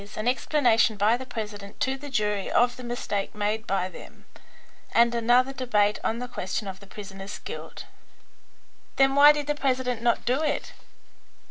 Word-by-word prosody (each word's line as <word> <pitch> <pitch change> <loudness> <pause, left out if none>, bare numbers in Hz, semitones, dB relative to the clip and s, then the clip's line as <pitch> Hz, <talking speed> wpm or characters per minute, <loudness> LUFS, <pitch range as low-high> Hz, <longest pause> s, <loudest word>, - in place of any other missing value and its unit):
an 215 +2 -2
explanation 245 -4 +2
by 210 +3 +3
the 260 +1 -7
president 210 -4 -7
to 265 +1 0
the 285 +2 -9
jury 210 -5 -1
of 245 0 +3
the 255 - -10
mistake 240 -5 -3
made 210 +1 -2
by 190 -1 0
them, 185 - -13 0.7
and 235 0 +4
another 245 +3 +3
debate 210 -6 +1
on 225 - 0
the 250 +1 -5
question 200 -3 -4
of 190 0 -7
the 200 - -15
prisoner's 195 0 -8
guilt." - - -8 1.1
"Then 270 0 +4
why 285 +1 +8
did 295 -1 -2
the 295 - 0
president 260 -4 -1
not 235 -1 +1
do 255 +5 +1
it?" 305 -2 -2
235 Hz, 165 wpm, -26 LUFS, 210-260 Hz, 1.1 s, why